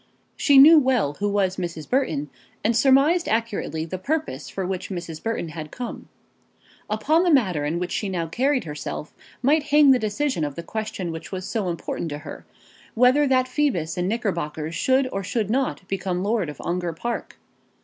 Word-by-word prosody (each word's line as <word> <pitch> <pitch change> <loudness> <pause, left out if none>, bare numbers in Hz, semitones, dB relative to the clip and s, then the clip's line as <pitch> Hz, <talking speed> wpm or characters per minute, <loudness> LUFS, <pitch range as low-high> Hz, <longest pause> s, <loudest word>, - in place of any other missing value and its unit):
She 285 -2 +4
knew 305 +4 +10
well 255 - +1
who 205 0 0
was 195 -2 0
Mrs. 170 -4 -5
Burton, 155 - 0 0.3
and 225 +2 +2
surmised 275 +8 +4
accurately 215 -8 -1
the 185 +3 -5
purpose 270 - -3
for 190 - -4
which 185 0 -4
Mrs. 170 -4 -6
Burton 225 -7 -2
had 155 0 -7
come. 245 +6 -7 0.8
Upon 245 +11 +2
the 360 - +2
manner 190 - +2
in 155 +3 -1
which 175 0 -3
she 205 - -2
now 175 -3 -2
carried 255 - 0
herself 150 -1 -6 0.3
might 300 +5 +4
hang 295 -1 +6
the 255 - +4
decision 215 - -1
of 145 -2 -3
the 170 - -6
question 200 -4 -4
which 165 0 -8
was 185 -1 -4
so 210 -6 -2
important 170 0 -4
to 145 - -4
her, 150 - -10 0.5
whether 255 +5 +4
that 255 -1 +3
Phoebus 255 - 0
in 180 0 -1
knickerbockers 170 -8 -2
should 260 +6 +2
or 195 - -3
should 215 +2 -1
not 255 -7 -1
become 185 -1 -2
lord 205 -5 0
of 150 - -9
Ongar 175 -1 -2
Park. 235 +9 -5
200 Hz, 180 wpm, -24 LUFS, 170-260 Hz, 0.8 s, knew